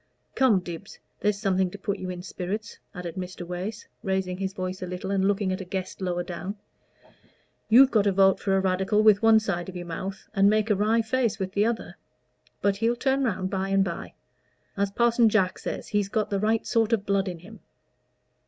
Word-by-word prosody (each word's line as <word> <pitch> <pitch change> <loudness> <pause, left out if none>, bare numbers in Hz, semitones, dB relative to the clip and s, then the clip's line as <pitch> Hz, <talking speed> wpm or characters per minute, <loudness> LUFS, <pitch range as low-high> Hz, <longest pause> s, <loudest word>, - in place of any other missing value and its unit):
Come, 235 -8 +3
Dibbs, 175 +2 -8 0.2
there's 210 -1 +1
something 190 -3 +1
to 205 - -9
put 200 0 -3
you 185 - -5
in 180 -1 -6
spirits," 195 +3 -5 0.2
added 175 -2 -5
Mr. 180 -1 -6
Wace, 185 +5 -5
raising 190 -3 -1
his 190 -1 -2
voice 185 0 -5
a 185 - -4
little 180 +2 -5
and 195 -1 +1
looking 195 -1 +1
at 185 - -4
a - - -4
guest 190 +1 -5
lower 175 -1 -1
down. 180 +3 -5 1.1
"You've 260 +4 +7
got 215 -3 +3
to 200 - +4
vote 195 0 +4
for 195 -1 +1
a - - +3
Radical 190 +3 +1
with 210 -2 +6
one 225 -1 +6
side 190 -5 -3
of 185 - -9
your 175 0 -5
mouth, 190 +3 -6
and 200 -1 +5
make 215 +1 +2
a - - +4
wry 220 +3 +2
face 235 -1 0
with 190 -2 -3
the 205 +2 +2
other; 235 -1 -4 0.7
but 200 -1 +2
he'll 230 +3 +1
turn 270 +2 +1
round 190 -6 -1
by 195 0 -1
and 195 0 +3
by. 170 -3 -6 0.6
As 200 0 0
Parson 235 +2 +3
Jack 190 -4 +1
says, - - -5
he's 205 -2 0
got 215 0 -1
the 200 - +1
right 220 +2 +1
sort 230 -1 +1
of 205 -3 +1
blood 200 -1 +1
in 180 -2 -4
him." 200 +7 -13
195 Hz, 210 wpm, -26 LUFS, 185-215 Hz, 1.1 s, You've